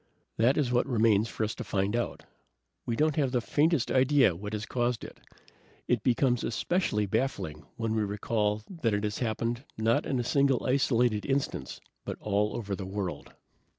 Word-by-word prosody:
"That 120 +5 +3
is 140 -5 +1
what 120 0 +2
remains 110 -2 +3
for - - -3
us 110 - -1
to - - -6
find 100 +2 0
out. 120 - -2 0.6
We 115 - 0
don't 155 +3 +1
have 140 -4 +2
the 125 - +2
faintest 150 +3 +1
idea 130 - +4
what 105 +4 -6
has 105 0 -3
caused 120 -2 -1
it. - - -10 0.7
It 125 -3 +2
becomes 125 +1 +2
especially 115 - 0
baffling 100 - -2
when 115 -2 -2
we 110 - +1
recall 105 +1 -1
that 150 - -1
it 105 - -2
has 105 -1 -2
happened, 115 +1 -2
not 110 +1 +1
in 130 - 0
a - - 0
single 135 0 +2
isolated 125 -4 +2
instance, 140 0 -2 0.2
but - - -5
all 105 0 0
over 100 -4 -3
the 95 -1 -6
world." 95 -6 -5
115 Hz, 180 wpm, -29 LUFS, 105-130 Hz, 0.7 s, idea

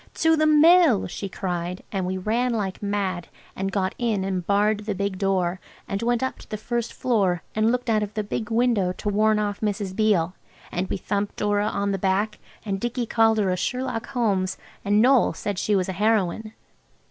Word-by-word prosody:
"To 320 0 +3
the 310 0 +2
Mill!" 310 - +6
she 195 +2 -5
cried, 180 -1 -4
and 190 -3 -2
we 185 +1 -2
ran 235 +6 0
like 200 -4 -3
mad, 195 -4 -2 0.3
and 195 0 -2
got 195 0 -1
in 225 -5 0
and 190 -2 -2
barred 210 +1 +1
the 210 - -1
big 200 -1 -2
door, 185 -2 0 0.3
and 195 - -3
went 240 +1 +1
up 260 - -3
to - - -15
the 215 - -3
first 235 +2 -3
floor, 195 -9 0
and 220 +1 +2
looked 250 0 -2
out 220 -2 +2
of 210 0 -4
the 215 - -1
big 210 +1 -4
window 225 -6 +2
to 210 - -4
warn 215 +1 +3
off 205 -1 -2
Mrs. 205 -3 -2
Beale. 190 -6 +2 0.4
And 185 +2 -2
we - - -1
thumped 200 +2 -2
Dora 205 0 +1
on 200 -1 -1
the 195 - -2
back, 200 +3 0 0.3
and 195 -2 -2
Dicky 240 +2 -2
called 225 -1 +3
her 200 -3 +2
a - - +1
Sherlock 250 +3 -2
Holmes, 200 -8 0 0.3
and 205 +3 +4
Noël 260 -2 +4
said 205 -2 -3
she 210 - +1
was 185 -2 +1
a 190 - -3
heroine. 215 +1 0
205 Hz, 205 wpm, -24 LUFS, 190-225 Hz, 0.4 s, Mill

